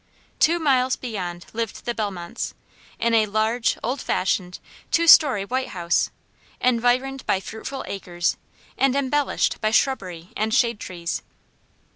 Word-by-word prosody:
Two 335 +2 +4
miles 260 -5 +2
beyond 180 -8 -5
lived 225 -1 -4
the 240 - -1
Bellmonts, 195 -6 -4 0.4
in 235 0 +1
a 220 -1 +4
large, 220 +3 +1
old 250 +4 -2
fashioned, 180 -1 -1 0.3
two 335 - +2
story 265 -11 +7
white 260 +4 -1
house, 170 0 +1 0.5
environed 255 +2 +1
by 190 - +2
fruitful 220 +7 -6
acres, 175 -3 -2 0.4
and 270 -1 +3
embellished 280 +1 0
by 215 - +2
shrubbery 185 -8 0
and 220 -1 0
shade 235 -4 +2
trees. 170 -4 -4
225 Hz, 130 wpm, -23 LUFS, 190-260 Hz, 0.5 s, story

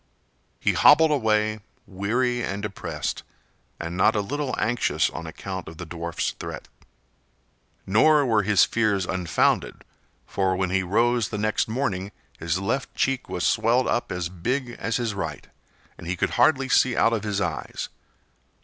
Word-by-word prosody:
He - - +1
hobbled 160 +1 +6
away, 110 -5 +1 0.3
weary 120 +6 -1
and 100 +1 -4
depressed, 85 -7 -4 0.6
and 85 +1 -5
not 95 +4 +3
a 105 - +2
little 140 +5 -3
anxious 120 +1 +1
on - - -7
account 95 -2 -6
of 80 - -10
the 90 - -6
dwarfs' 85 +1 -3
threat. - - -7 1.2
Nor 145 +9 +4
were 110 -4 +3
his 100 -2 +4
fears 105 -5 +1
unfounded, 90 -2 0 0.4
for 95 -1 0
when 95 -1 -1
he 95 0 +2
rose 115 +5 +1
next 110 +1 0
morning 110 -5 -2 0.3
his 85 +1 -1
left 115 +8 -2
cheek 135 -1 -1
was 90 - -2
swelled 115 +3 +2
up 120 - -1
as 90 -1 -2
big 120 +9 -3
as 115 0 -1
his 120 -3 -2
right, 80 -7 -5 0.5
and 85 - -9
he 90 - -1
could - - -1
hardly 135 +2 +3
see 130 -1 +3
out 115 - +4
of 110 - 0
his 105 -2 -1
eyes. 85 -6 -3
105 Hz, 155 wpm, -24 LUFS, 95-120 Hz, 1.2 s, hobbled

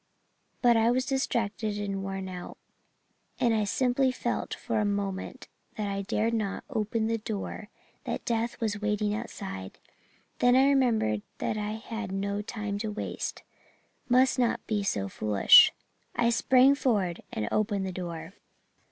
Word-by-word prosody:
But 240 -1 +6
I 225 0 +4
was 255 +1 +1
distracted 230 -5 -1
and 200 -1 -3
worn 195 -1 -4
out, 180 -1 -8 0.8
and 235 -2 +3
I 215 -1 +1
simply 255 +4 +2
felt 240 -1 -3
for 230 -3 -2
a - - +2
moment 200 -2 -3 0.3
that 210 -1 -2
I 200 0 -2
dared 215 +3 0
not 210 -3 -2
open 220 -1 -1
the 225 0 0
door 215 0 -5 0.4
that - - -4
death 235 0 -1
was 215 -2 -2
waiting 210 0 0
outside. 195 - -6 0.6
Then 245 0 +5
I 265 +1 +6
remembered 230 - +2 0.2
that - - -2
I 210 0 -2
had 220 -2 -6
no 200 +1 -2
time 210 -2 -4
to 215 0 -3
waste 210 - -5 0.7
must 255 +1 +4
not 240 -2 +1
be 210 -2 0
so 100 - -1
foolish 105 +1 +6 0.4
I 235 -1 +2
sprang 255 +3 +5
forward 205 - 0
and 105 - -3
opened 205 -2 0
the 190 - -3
door. 170 -1 -6
215 Hz, 150 wpm, -28 LUFS, 195-235 Hz, 0.8 s, But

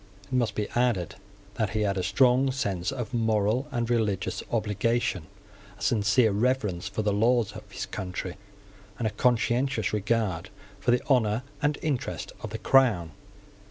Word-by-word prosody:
It 95 - -12
must 125 -3 +1
be 105 - -1
added 120 -8 +1 0.4
that 110 -3 +1
he - - +1
had 100 -2 +1
a 95 - 0
strong 125 +7 +3
sense 100 -9 -2
of 130 -2 -5
moral 110 +3 +1
and 120 -4 -1
religious 110 -5 0
obligation, 105 -4 0 0.5
a - - -18
sincere 110 +1 +3
reverence 105 -4 0
for 100 +2 -3
the 105 -1 +1
laws 115 +1 +2
of 105 -1 -11
his - - -4
country, 90 -1 -5 0.6
and 120 - -2
a 110 - +1
conscientious 120 +2 +1
regard 105 -4 0 0.3
for 100 - -2
the 120 0 +3
honour 120 -4 +2 0.2
and 145 0 +1
interest 145 -5 -2
of 110 - -5
the 110 - -4
Crown. 110 - +3
110 Hz, 160 wpm, -27 LUFS, 100-125 Hz, 0.6 s, strong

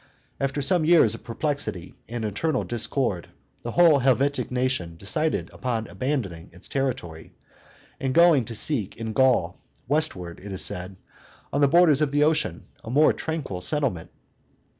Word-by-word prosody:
After 135 +1 -1
some 170 +4 +3
years 160 -9 +5
of 115 - -8
perplexity 115 - -3 0.2
and 115 -1 -4
internal 130 +7 -1
discord, 120 -5 -2 0.3
the 120 - -6
whole 170 -4 +5
Helvetic 135 +2 +1
nation 125 -10 -2
decided 155 - -1
upon 115 -4 -3
abandoning 115 - -4
its 90 - -10
territory, 115 - -4 0.6
and 135 - -1
going 165 -4 +5
to 115 - -8
seek 110 -2 -1
in 110 -1 -5
Gaul, 130 -1 +2 0.3
westward, 125 - -1
it 100 - -8
is 95 - 0
said, 95 -1 -5 0.6
on 140 - +1
the 140 - +6
borders 155 -1 +4
of 150 - +2
the 145 0 +3
ocean, 150 - 0 0.2
a - - -8
more 145 +5 +4
tranquil 150 - -4
settlement. 120 - -1
130 Hz, 150 wpm, -24 LUFS, 105-150 Hz, 0.6 s, the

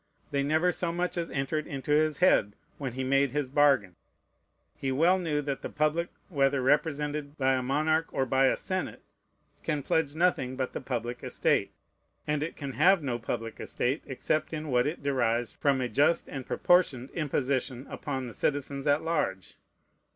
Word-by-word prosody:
They 140 - +1
never 155 +5 +2
so 175 -1 -2
much 175 +1 -1
as 170 -1 -2
entered 150 +3 -2
into 135 +1 -4
his 155 0 +3
head, 105 - +3 0.2
when 135 -4 -4
he 130 +1 -3
made 135 0 +2
his 145 -3 -1
bargain. 135 -11 +3 0.8
He 135 - -2
well 170 +8 +3
knew 150 -4 -1
that 140 -1 -3
the - - -5
public, 155 +3 0 0.2
whether 140 -5 +2
represented 145 +1 0
by 135 -1 +2
a 130 - +1
monarch 155 +5 +1
or 135 - 0
by 130 +1 +3
a - - +2
senate, 185 -1 -3 0.6
can 145 -2 -2
pledge 155 0 0
nothing 160 -7 +1
but 130 -1 -3
the - - -4
public 120 -2 -4
estate; - - +1 0.5
and 150 -1 0
it 155 - -3
can 140 -2 -5
have 175 +7 +4
no 125 -4 -2
public 115 0 -4
estate, 130 +5 -1
except 155 +4 -1
in 155 -1 -4
what 125 0 +2
it 150 -1 -4
derives 120 -4 +1
from 140 -2 +1
a 125 - 0
just 145 +8 +2
and 135 -3 -7
proportioned 145 -8 +2
imposition 135 -4 -1
upon 135 -3 -4
the 120 - -7
citizens 140 -1 -2
at 145 +1 +3
large. 125 - -1
140 Hz, 175 wpm, -29 LUFS, 130-155 Hz, 0.8 s, have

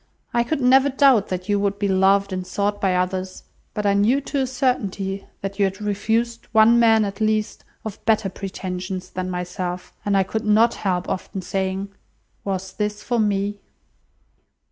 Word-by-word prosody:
I 240 - +3
could 275 +4 -2
never 265 +2 +5
doubt 265 -6 +4
that 185 0 -4
you 205 -1 +2
would 200 0 0
be 205 - 0
loved 195 +1 +3
and 185 -1 -4
sought 205 0 -1
by 190 -2 +2
others, 185 +1 -2 0.3
but 210 - -2
I 200 - +4
knew 210 +7 +3
to 280 +1 -3
a 265 - +1
certainty 200 -7 -1
that 195 +1 -5
you 200 - +5
had 190 0 -3
refused 225 +3 -1
one 225 +2 +6
man, 225 -2 +5
at 200 +1 -6
least, 215 0 0 0.2
of 220 -2 -7
better 220 -2 +2
pretensions 185 -1 -5
than 185 0 -3
myself; 180 0 -4
and 200 -1 +2
I 195 - +4
could 220 +4 -3
not 220 +2 +4
help 180 -3 -2
often 185 0 -4
saying, 190 +1 -2 0.5
'Was 190 -1 -3
this 210 0 -3
for 240 -1 0
me? 205 -1 0
200 Hz, 175 wpm, -22 LUFS, 190-220 Hz, 0.5 s, one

